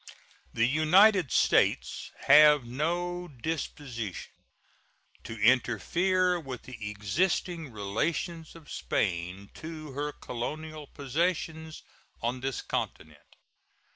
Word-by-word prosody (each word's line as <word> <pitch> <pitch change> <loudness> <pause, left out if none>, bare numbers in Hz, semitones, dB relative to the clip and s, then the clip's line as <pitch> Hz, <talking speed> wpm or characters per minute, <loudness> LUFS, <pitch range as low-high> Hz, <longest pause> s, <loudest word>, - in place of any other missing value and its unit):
The 115 - +2
United 165 - +5
States - - +2
have 150 -1 +7
no 175 +7 -2
disposition 135 - -5 0.9
to 115 - -7
interfere 175 - +2
with 135 -6 -7
the 115 -5 -7
existing 155 - -1
relations 155 - -3
of 165 -3 -13
Spain 90 +1 -2
to 155 -2 -8
her 145 +2 -3
colonial 155 +5 -6
possessions 160 +2 -2 0.4
on 120 +2 -2
this 135 0 -3
continent. 75 -1 -5
150 Hz, 90 wpm, -29 LUFS, 115-165 Hz, 0.9 s, have